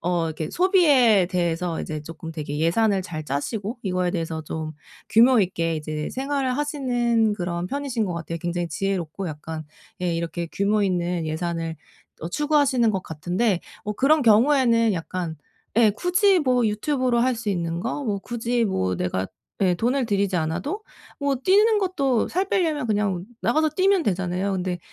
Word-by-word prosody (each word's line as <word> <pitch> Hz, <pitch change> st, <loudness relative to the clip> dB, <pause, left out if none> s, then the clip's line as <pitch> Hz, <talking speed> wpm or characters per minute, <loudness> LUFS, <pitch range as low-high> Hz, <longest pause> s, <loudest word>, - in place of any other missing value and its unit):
어 175 Hz, -1 st, 0 dB
이렇게 160 Hz, 0 st, -4 dB
소비에 290 Hz, -, +4 dB
대해서 175 Hz, -2 st, -1 dB
이제 155 Hz, -1 st, -4 dB
조금 165 Hz, +1 st, -8 dB
되게 150 Hz, -2 st, -4 dB
예산을 190 Hz, +5 st, +2 dB
잘 155 Hz, -4 st, -6 dB
짜시고 200 Hz, -, -3 dB
이거에 180 Hz, -2 st, 0 dB
대해서 165 Hz, -2 st, -3 dB
좀 155 Hz, 0 st, -5 dB, 0.4 s
규모 240 Hz, +2 st, +6 dB
있게 165 Hz, -3 st, 0 dB
이제 155 Hz, 0 st, -4 dB
생활을 270 Hz, -1 st, -1 dB
하시는 245 Hz, -7 st, +1 dB
그런 175 Hz, -2 st, -3 dB
편이신 275 Hz, -5 st, -2 dB
거 180 Hz, -, -3 dB
같아요. 170 Hz, 0 st, -5 dB
굉장히 175 Hz, 0 st, -2 dB
지혜롭고 190 Hz, +1 st, -3 dB
약간 155 Hz, +1 st, -6 dB, 0.4 s
예 175 Hz, -2 st, 0 dB
이렇게 170 Hz, +1 st, -3 dB
규모 205 Hz, +1 st, +1 dB
있는 175 Hz, -3 st, -1 dB
예산을 165 Hz, 0 st, -3 dB, 0.5 s
어 165 Hz, -, -4 dB
추구하시는 285 Hz, -4 st, +2 dB
것 190 Hz, -3 st, -2 dB
같은데. 180 Hz, +5 st, -1 dB, 0.2 s
뭐 210 Hz, -, -3 dB
그런 295 Hz, +6 st, +3 dB
경우에는 230 Hz, -1 st, +4 dB
약간 170 Hz, -1 st, -4 dB, 0.4 s
예 225 Hz, -2 st, +6 dB
굳이 365 Hz, -, +3 dB
뭐 250 Hz, -4 st, +2 dB
유튜브로 250 Hz, +3 st, 0 dB
할 255 Hz, +1 st, +2 dB
수 225 Hz, -1 st, -5 dB
있는 170 Hz, -2 st, -2 dB
거 285 Hz, -, -3 dB
뭐 205 Hz, -4 st, -1 dB
굳이 235 Hz, +1 st, -1 dB
뭐 95 Hz, -, 0 dB
내가 95 Hz, +2 st, -1 dB, 0.4 s
예 180 Hz, -2 st, +3 dB
돈을 250 Hz, +7 st, 0 dB
들이지 200 Hz, -3 st, +1 dB
않아도 175 Hz, -, -2 dB, 0.4 s
뭐 280 Hz, -1 st, +1 dB
뛰는 415 Hz, -, +4 dB
것도 280 Hz, -, +1 dB
살 375 Hz, +3 st, 0 dB
빼려면 315 Hz, -10 st, 0 dB
그냥 205 Hz, -4 st, 0 dB, 0.2 s
나가서 310 Hz, +6 st, +2 dB
뛰면 380 Hz, +3 st, +2 dB
되잖아요. 185 Hz, 0 st, -1 dB
근데 180 Hz, -1 st, -2 dB
200 Hz, 335 characters per minute, -24 LUFS, 170-255 Hz, 0.5 s, 규모